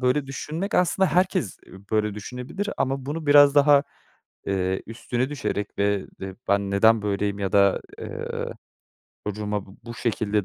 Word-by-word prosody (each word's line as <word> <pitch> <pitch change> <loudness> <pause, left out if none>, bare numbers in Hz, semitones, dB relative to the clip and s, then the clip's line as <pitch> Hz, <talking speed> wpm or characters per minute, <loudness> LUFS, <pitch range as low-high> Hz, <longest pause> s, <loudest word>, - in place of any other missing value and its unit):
böyle 130 +2 +1
düşünmek 160 +8 -4
aslında 185 +2 +3
herkes, 180 - +1
ııı, 95 - -12
böyle 105 -1 +1
düşünebilir 125 - -5
ama 135 0 -1
bunu 155 +2 -4
biraz 145 0 +7
daha, 145 0 +6 0.6
eee, 95 -1 0
üstüne 120 +2 -2
düşerek 105 -8 -3
ve 100 -1 +1
de 95 -1 -6
"Ben 100 0 +2
neden 110 +2 +4
böyleyim?" 100 0 -1
ya 95 -2 -2
da, 100 -1 +4 0.2
ııı, - - -5 0.7
"Çocuğuma 105 -1 -3
bu 95 - -15
bu 120 - -7
şekilde 105 -3 0
110 Hz, 150 wpm, -25 LUFS, 100-145 Hz, 0.7 s, biraz